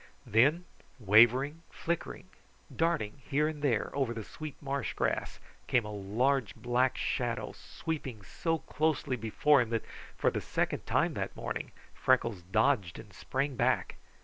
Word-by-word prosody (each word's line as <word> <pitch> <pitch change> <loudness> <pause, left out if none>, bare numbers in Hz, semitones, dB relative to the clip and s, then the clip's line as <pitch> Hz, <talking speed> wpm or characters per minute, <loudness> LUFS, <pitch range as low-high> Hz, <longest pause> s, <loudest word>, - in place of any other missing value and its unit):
Then, 145 - +3 0.3
wavering, 120 +9 +5
flickering, 170 +2 -4 0.5
darting 160 -8 0
here 150 +2 +2
and 155 -2 -5
there 125 -7 +1
over 130 -4 0
the 110 - -4
sweet 155 +6 -8
marsh 140 -2 -3
grass, - - -1 0.3
came 120 -4 +2
a 105 - -5
large 110 +5 0
black 120 +2 +1
shadow, 120 -3 -1
sweeping 135 -10 -6
so 165 - -1
closely 150 -3 -1
before 125 +5 +3
him 120 - -2
that 115 -1 -1 0.3
for - - +2
the - - -2
second - - -2
time - - +2
that - - -4
morning - - -4 0.2
Freckles 115 -7 +2
dodged 105 0 +1
and 105 -3 -12
sprang 135 - -2
back. - - +1
130 Hz, 145 wpm, -31 LUFS, 110-145 Hz, 0.5 s, wavering